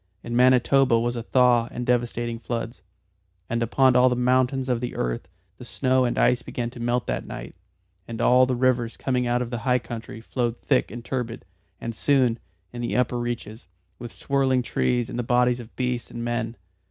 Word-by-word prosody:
In 120 Hz, 0 st, -4 dB
Manitoba 130 Hz, 0 st, +4 dB
was 120 Hz, +1 st, -1 dB
a 120 Hz, -, -3 dB
thaw 120 Hz, -1 st, +3 dB
and 125 Hz, -, -5 dB
devastating 120 Hz, -1 st, -1 dB
floods. 115 Hz, -4 st, -5 dB, 0.7 s
And 115 Hz, 0 st, 0 dB
upon 130 Hz, +2 st, +3 dB
all 125 Hz, +1 st, +6 dB
the 125 Hz, -, 0 dB
mountains 130 Hz, +1 st, +1 dB
of 125 Hz, -2 st, 0 dB
the 125 Hz, -, -4 dB
earth -, -, -3 dB, 0.3 s
the -, -, -9 dB
snow 130 Hz, 0 st, +1 dB
and 120 Hz, -, -1 dB
ice 125 Hz, -, +3 dB
began 120 Hz, -1 st, -4 dB
to 120 Hz, -, -11 dB
melt 120 Hz, +1 st, 0 dB
that -, -, -3 dB
night, -, -, -7 dB, 0.5 s
and 115 Hz, -1 st, -6 dB
all 125 Hz, +2 st, +5 dB
the 130 Hz, -, 0 dB
rivers 120 Hz, -2 st, +1 dB
coming 125 Hz, -2 st, -1 dB
out 120 Hz, +1 st, +1 dB
of 120 Hz, 0 st, -8 dB
high 125 Hz, +2 st, +1 dB
country 115 Hz, -2 st, -7 dB
flowed 120 Hz, 0 st, -2 dB
thick 135 Hz, -, +1 dB
and 120 Hz, -1 st, -8 dB
turbid, 120 Hz, -5 st, -4 dB, 0.3 s
and 115 Hz, -, -5 dB
soon 125 Hz, -2 st, +2 dB, 0.3 s
in 120 Hz, -, -5 dB
their 120 Hz, -, 0 dB
upper 125 Hz, 0 st, 0 dB
reaches 115 Hz, -4 st, -5 dB, 0.3 s
with 120 Hz, -, -7 dB
swirling 135 Hz, -2 st, +1 dB
trees 120 Hz, 0 st, 0 dB
and 120 Hz, -, -5 dB
the -, -, 0 dB
bodies 125 Hz, +1 st, +2 dB
of 120 Hz, -1 st, -11 dB
beasts 125 Hz, -1 st, -2 dB
and 120 Hz, -, -6 dB
men. 120 Hz, -1 st, -2 dB
120 Hz, 190 wpm, -24 LUFS, 115-125 Hz, 0.7 s, all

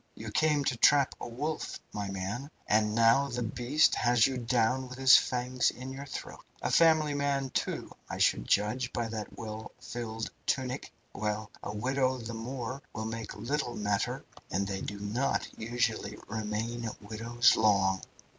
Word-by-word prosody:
You 110 Hz, 0 st, -7 dB
came 150 Hz, +3 st, +3 dB
to 130 Hz, -, +1 dB
trap 140 Hz, +3 st, +5 dB
a -, -, -4 dB
wolf, 150 Hz, +7 st, -3 dB, 0.2 s
my 100 Hz, -1 st, -3 dB
man, 100 Hz, +8 st, -4 dB, 0.2 s
and 105 Hz, 0 st, +2 dB
now 115 Hz, +5 st, +5 dB
the 125 Hz, -2 st, -2 dB
beast 125 Hz, +7 st, +3 dB
has 120 Hz, -2 st, +4 dB
you 135 Hz, -, 0 dB
down 125 Hz, +2 st, +1 dB
with 125 Hz, -, -8 dB
his 130 Hz, 0 st, +8 dB
fangs 125 Hz, 0 st, +2 dB
in 130 Hz, +1 st, -7 dB
your 140 Hz, +1 st, -7 dB
throat. -, -, -7 dB, 0.2 s
A -, -, 0 dB
family 160 Hz, -3 st, +5 dB
man, 140 Hz, -2 st, 0 dB
too, -, -, -2 dB, 0.2 s
I -, -, -4 dB
should -, -, +2 dB
judge, 110 Hz, +5 st, +1 dB
by 120 Hz, -1 st, -1 dB
that 110 Hz, -2 st, -6 dB
well 110 Hz, 0 st, -6 dB
filled 115 Hz, -2 st, -5 dB, 0.2 s
tunic. 130 Hz, -1 st, -1 dB, 0.2 s
Well, 105 Hz, +1 st, -2 dB
a -, -, -5 dB
widow 130 Hz, +3 st, +1 dB
the 115 Hz, -1 st, -6 dB
more 125 Hz, +3 st, -5 dB
will 110 Hz, -, -4 dB
make 110 Hz, -1 st, -5 dB
little 120 Hz, +3 st, -2 dB
matter, 105 Hz, -1 st, -1 dB, 0.2 s
and 100 Hz, +2 st, 0 dB
they 95 Hz, -1 st, -3 dB
do 100 Hz, -, -5 dB
not 110 Hz, +7 st, 0 dB
usually 115 Hz, -2 st, -1 dB
remain 110 Hz, +2 st, -3 dB
widows 115 Hz, +3 st, +2 dB
long. 95 Hz, -3 st, +3 dB
115 Hz, 165 wpm, -30 LUFS, 110-130 Hz, 0.2 s, his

